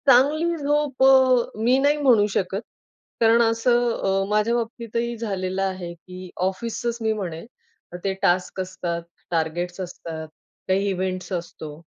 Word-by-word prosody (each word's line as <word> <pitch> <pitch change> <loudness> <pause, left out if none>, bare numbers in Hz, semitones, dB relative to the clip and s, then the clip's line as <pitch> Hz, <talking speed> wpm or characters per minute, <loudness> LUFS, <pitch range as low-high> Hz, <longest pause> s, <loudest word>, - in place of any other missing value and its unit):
चांगली 300 +6 +4
झोप 290 -2 0
अ, 260 -4 +5
मी 250 +3 +4
नाही 290 +2 +3
म्हणू 250 -8 +5
शकत. 190 +1 -1 0.6
कारण 230 +1 +5
असं 240 +1 +3
अ, 195 0 +2
माझ्या 210 +2 +2
बाबतीतही 235 0 -3
झालेलं 195 -4 -2
आहे, 185 -3 -3
की 185 +2 -11 0.2
ऑफिसच 230 +4 -2
मी 220 0 +1
म्हणेल 180 -5 -5 0.6
ते 195 - 0
टास्क 180 +1 +1
असतात, 175 -2 -4 0.3
टार्गेट्स 175 +2 -1
असतात, 165 -3 -6 0.4
काही 195 +2 +1
इव्हेंट्स 185 0 -3
असतो. 160 -3 -6
205 Hz, 130 wpm, -23 LUFS, 185-240 Hz, 0.6 s, अ